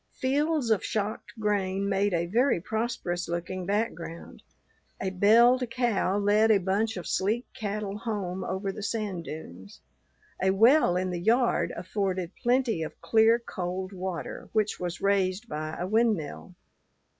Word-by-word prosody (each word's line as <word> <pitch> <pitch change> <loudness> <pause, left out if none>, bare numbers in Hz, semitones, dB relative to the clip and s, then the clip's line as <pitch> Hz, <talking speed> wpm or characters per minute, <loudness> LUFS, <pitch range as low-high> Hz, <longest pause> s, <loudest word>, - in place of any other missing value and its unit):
Fields 285 -1 0
of 215 - +2
shocked 215 0 -3
grain 200 -2 0
made 200 +1 +1
a 170 -1 0
very 240 +4 +2
prosperous 185 -4 -3
looking 175 +1 -4
background. 195 -5 -3 0.6
A 190 - -2
belled 235 +7 +5
cow 230 -5 +1
led 205 +2 +3
a 215 - +6
bunch 195 +4 0
of 180 - -6
sleek 215 +6 0
cattle 205 -1 -4
home 195 -5 -3
over 195 +2 -2
the 210 - -8
sand 200 -5 -3
dunes. 95 - -9 0.6
A 190 - +3
well 220 - +5
in 185 0 -1
the 175 -1 -3
yard 235 +5 +2
afforded 185 -2 -2
plenty 240 -7 +2
of 160 - -6
clear, 225 +1 +4
cold 185 -4 -5
water, 185 -2 -5
which 215 -1 0
was 175 -1 -4
raised 195 +2 +1
by 155 -1 -4
a 175 - -2
windmill. 205 -5 0
200 Hz, 145 wpm, -28 LUFS, 180-225 Hz, 0.6 s, a